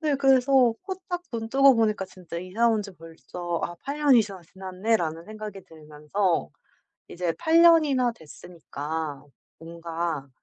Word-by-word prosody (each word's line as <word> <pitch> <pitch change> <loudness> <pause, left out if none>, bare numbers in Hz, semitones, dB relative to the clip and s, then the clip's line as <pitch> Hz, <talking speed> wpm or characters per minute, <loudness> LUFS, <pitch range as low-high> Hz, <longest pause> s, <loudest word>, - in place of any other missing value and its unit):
네 305 -3 +1
그래서 265 -2 +4
후딱 370 -2 -5
눈 225 -1 -4
뜨고 275 +2 +6
보니까 215 -4 +1
진짜 180 -2 -10
'이사 185 +7 0
온 220 -2 +1
지 200 - -10
벌써 170 +1 -6
아 175 - -5
8 280 +2 -5
년이 275 -6 +5
지났스 190 -5 -11
지났네.'라는 185 -3 -2
생각이 215 -1 -8
들면서 155 - -2 0.6
이제 175 -1 -3
8 330 0 +4
년이나 300 -7 +5
됐으니까 160 -4 -7 0.3
뭔가 165 -3 -5
195 Hz, 275 characters per minute, -25 LUFS, 165-255 Hz, 0.6 s, 뜨고